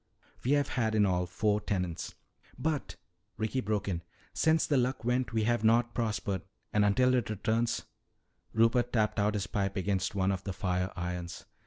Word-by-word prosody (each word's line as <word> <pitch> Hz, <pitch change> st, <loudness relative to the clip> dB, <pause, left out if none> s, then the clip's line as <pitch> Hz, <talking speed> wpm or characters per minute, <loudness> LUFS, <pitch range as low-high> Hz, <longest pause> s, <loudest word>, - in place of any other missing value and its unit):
We 130 Hz, -, +2 dB
have 145 Hz, -1 st, +2 dB
had 110 Hz, -3 st, 0 dB
in 105 Hz, -1 st, +5 dB
all 90 Hz, -2 st, +1 dB
four 105 Hz, +3 st, +1 dB
tenants." 90 Hz, -5 st, -3 dB, 0.4 s
"But," 155 Hz, -2 st, -2 dB, 0.4 s
Ricky 110 Hz, +4 st, -1 dB
broke 105 Hz, -1 st, -1 dB
in, 85 Hz, -4 st, -1 dB, 0.3 s
"since 160 Hz, 0 st, +3 dB
the 145 Hz, -, +1 dB
Luck 125 Hz, -2 st, 0 dB
went 125 Hz, +1 st, +1 dB
we 110 Hz, -1 st, +1 dB
have 120 Hz, 0 st, +1 dB
not 120 Hz, +2 st, +4 dB
prospered. 105 Hz, -5 st, -1 dB, 0.3 s
And 105 Hz, -, +4 dB
until 125 Hz, +5 st, +4 dB
it 120 Hz, -5 st, +1 dB
returns 110 Hz, +3 st, 0 dB, 0.3 s
" -, -, -46 dB
Rupert 115 Hz, +2 st, +3 dB
tapped 110 Hz, -2 st, +2 dB
out 105 Hz, +1 st, +2 dB
his 100 Hz, -1 st, -1 dB
pipe 100 Hz, -1 st, -1 dB
against 95 Hz, +1 st, 0 dB
one 95 Hz, 0 st, +2 dB
of 95 Hz, -1 st, -3 dB
the 100 Hz, -, -3 dB
fire 90 Hz, 0 st, -1 dB
irons. 90 Hz, 0 st, -5 dB
105 Hz, 180 wpm, -31 LUFS, 95-120 Hz, 0.4 s, in